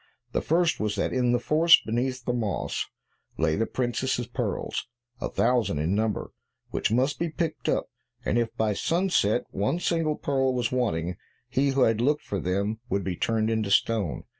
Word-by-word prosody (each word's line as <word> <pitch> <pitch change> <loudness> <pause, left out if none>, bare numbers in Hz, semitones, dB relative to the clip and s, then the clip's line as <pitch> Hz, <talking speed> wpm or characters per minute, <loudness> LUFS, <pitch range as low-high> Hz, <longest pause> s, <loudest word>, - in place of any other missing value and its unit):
The - - 0
first 170 +1 +2
was 105 -1 -1
that - - -1
in 125 -1 +2
the 120 - +3
forest, 155 +7 +5
beneath 125 +2 -1
the 125 - 0
moss, 110 -4 -2 0.5
lay 80 -1 +2
the 115 - 0
princess's 125 0 -1
pearls, 120 - -3 0.3
a - - -3
thousand 115 -9 +1
in 80 +5 0
number, 110 +1 -1 0.4
which - - 0
must 130 +5 +1
be 170 - 0
picked 165 0 -2
up, - - +1 0.4
and 120 - +2
if 115 -1 0
by 110 -1 +1
sunset 165 - +1
one 105 - 0
single 165 -3 +1
pearl 135 -3 0
was 120 -2 0
wanting, 90 -9 -1 0.3
he 135 +2 +2
who 135 0 +1
had 115 -2 +3
looked 150 +4 +2
for 100 - -3
them 100 +5 -1
would 100 -4 0
be 95 -2 -2
turned 110 +3 0
into 110 -2 0
stone. 100 -3 +1
120 Hz, 180 wpm, -27 LUFS, 105-135 Hz, 0.5 s, forest